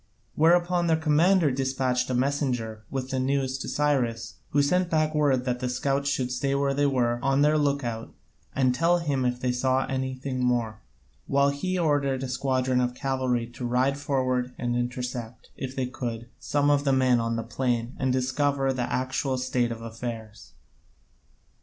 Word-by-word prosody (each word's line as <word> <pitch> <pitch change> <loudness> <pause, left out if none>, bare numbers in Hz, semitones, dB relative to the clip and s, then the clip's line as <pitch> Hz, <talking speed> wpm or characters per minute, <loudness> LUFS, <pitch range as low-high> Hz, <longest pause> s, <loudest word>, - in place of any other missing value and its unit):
Whereupon 175 +2 +3
their 160 -1 +3
commander 160 +1 +3
despatched 130 -1 0
a 130 - 0
messenger 125 -5 -1
with 130 -1 -4
the 130 - 0
news 135 0 0
to - - -5
Cyrus, 125 -6 0
who 145 0 +3
sent 180 +5 +1
back 155 -1 +1
word 140 -4 +2
that 125 -1 -1
the 125 0 -2
scouts 140 +2 0
should 130 -2 -1
stay 135 +2 0
where 140 0 +1
they 145 +1 +2
were, 120 -3 +1
on 135 +1 +2
their 150 +1 +4
look 145 -2 +1
out, 115 -1 -4 0.4
and 130 -2 +3
tell 170 +6 +3
him 145 -6 -1
if 125 0 0
they 125 0 0
saw 130 +1 +1
anything 130 0 -3
more, 115 -3 0 0.5
while 140 0 +3
he 185 +6 -2
ordered 140 -5 +1
a - - -2
squadron 130 -1 0
of 125 0 -1
cavalry 130 -3 -1
to 120 +1 -9
ride 125 +3 +1
forward, 130 -3 -1
and 120 -1 -1
intercept, 120 -1 -4
if 130 0 -6
they 130 - -1
could, 120 -2 -5
some 145 0 +1
of 145 -1 +2
the 135 -2 +2
men 130 -2 +3
on 115 0 -1
the 115 - -2
plain 120 0 -2
and 130 -1 +1
so 130 - +2
discover 135 +1 0
the 125 -2 -3
actual 130 +1 -1
state 125 -2 0
of 115 0 -6
affairs. 115 -2 -7
130 Hz, 180 wpm, -26 LUFS, 125-140 Hz, 0.5 s, their